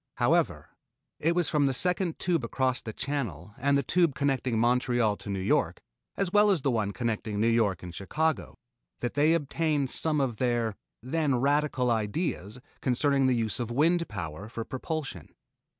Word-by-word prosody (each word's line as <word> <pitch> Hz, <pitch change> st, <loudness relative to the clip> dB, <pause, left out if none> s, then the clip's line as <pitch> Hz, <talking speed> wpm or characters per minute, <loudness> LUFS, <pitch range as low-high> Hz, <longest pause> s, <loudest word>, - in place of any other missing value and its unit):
However, -, -, +1 dB, 0.5 s
it 165 Hz, +2 st, +1 dB
was 175 Hz, -3 st, +2 dB
from 145 Hz, -2 st, +2 dB
the 135 Hz, -, 0 dB
second 180 Hz, +1 st, 0 dB
tube 170 Hz, -6 st, 0 dB
across 130 Hz, +2 st, 0 dB
the 110 Hz, -, -6 dB
Channel 105 Hz, -, -4 dB
and 140 Hz, +2 st, +3 dB
the 140 Hz, -, 0 dB
tube 170 Hz, 0 st, +2 dB
connecting 130 Hz, -4 st, 0 dB
Montreal 120 Hz, -2 st, +2 dB
to -, -, -10 dB
New 100 Hz, -1 st, -2 dB
York, 95 Hz, -, +1 dB, 0.4 s
as 195 Hz, -3 st, -1 dB
well 210 Hz, 0 st, +6 dB
as 180 Hz, -9 st, +2 dB
the 135 Hz, -, +2 dB
one 110 Hz, -4 st, 0 dB
connecting 110 Hz, 0 st, -2 dB
New 110 Hz, -, +3 dB
York 110 Hz, -6 st, +2 dB
and 90 Hz, -1 st, -7 dB
Chicago, 155 Hz, -, -2 dB, 0.4 s
that 120 Hz, -, -2 dB
they 150 Hz, +4 st, +4 dB
obtained 150 Hz, -2 st, 0 dB
some 155 Hz, -2 st, +2 dB
of 130 Hz, -5 st, -1 dB
their 120 Hz, -3 st, 0 dB, 0.3 s
then 145 Hz, +1 st, 0 dB
radical 140 Hz, -1 st, +1 dB
ideas 110 Hz, -, -2 dB, 0.2 s
concerning 135 Hz, +1 st, +2 dB
the 130 Hz, -, +3 dB
use 115 Hz, -1 st, -1 dB
of 120 Hz, -2 st, -3 dB
wind 165 Hz, +7 st, +2 dB
power 95 Hz, 0 st, -6 dB
for 115 Hz, -1 st, -5 dB
propulsion. 135 Hz, -, -5 dB
130 Hz, 170 wpm, -28 LUFS, 115-150 Hz, 0.5 s, well